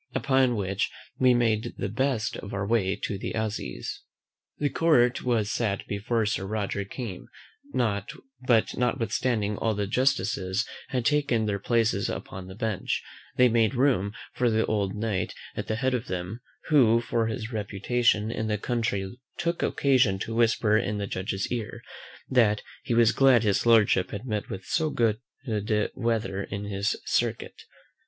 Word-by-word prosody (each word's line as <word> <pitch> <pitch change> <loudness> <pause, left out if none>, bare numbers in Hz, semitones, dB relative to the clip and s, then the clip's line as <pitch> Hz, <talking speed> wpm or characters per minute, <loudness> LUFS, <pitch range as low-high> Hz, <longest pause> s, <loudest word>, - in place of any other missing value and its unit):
Upon 130 -1 +3
which 100 -1 -1 0.3
we 125 -1 +5
made 115 -1 +1
the - - -2
best 115 +1 -1
of 100 - -7
our 100 0 -1
way 100 -3 +1
to 100 - -2
the - - -4
assizes. 105 - -4 0.6
The 145 -1 0
court 125 -7 +3
was 115 -4 +1
sat 110 -3 -1
before 110 +3 -1
Sir 95 -2 -1
Roger 100 -1 -2
came; 100 -3 -7 0.4
but 120 +2 0
notwithstanding 115 -3 0
all 110 -2 0
the 105 0 -1
justices 110 -5 0 0.2
had 125 -3 -2
taken 140 -5 +2
their 100 -1 -1
places 115 +1 +1
upon 95 -1 -6
the 95 - -9
bench, 110 -3 -2 0.3
they 125 - +7
made 115 +1 +2
room 120 -7 +2 0.2
for 125 -1 +2
the 110 0 +2
old 100 -2 -1
Knight 105 -4 -2 0.2
at - - -4
the 110 - 0
head 130 +3 0
of 125 0 -2
them; 90 +6 -4 0.3
who 120 -7 +5
for 115 -1 0
his 110 +1 -4
reputation 110 +2 +1
in 110 -1 -2
the 105 -1 0
country 110 -1 -2 0.2
took 170 0 -1
occasion 130 -8 +3
to 110 +4 -4
whisper 110 -2 +3
in 105 0 -2
the 100 - -2
judge's 95 0 -3
ear, 115 -4 -4 0.4
that 110 -5 +3 0.2
he 120 - -1
was 115 -1 +5
glad 130 -4 +5
his 105 +2 +1
lordship 110 -5 +5
had 105 +3 -6
met 105 -4 -3
with 95 - -6
so 160 -1 0
much 115 -6 +1 0.4
good 105 0 0
weather 110 -5 -1
in 100 0 -5
his 100 0 -1
circuit. - - -1
110 Hz, 160 wpm, -27 LUFS, 100-120 Hz, 0.6 s, they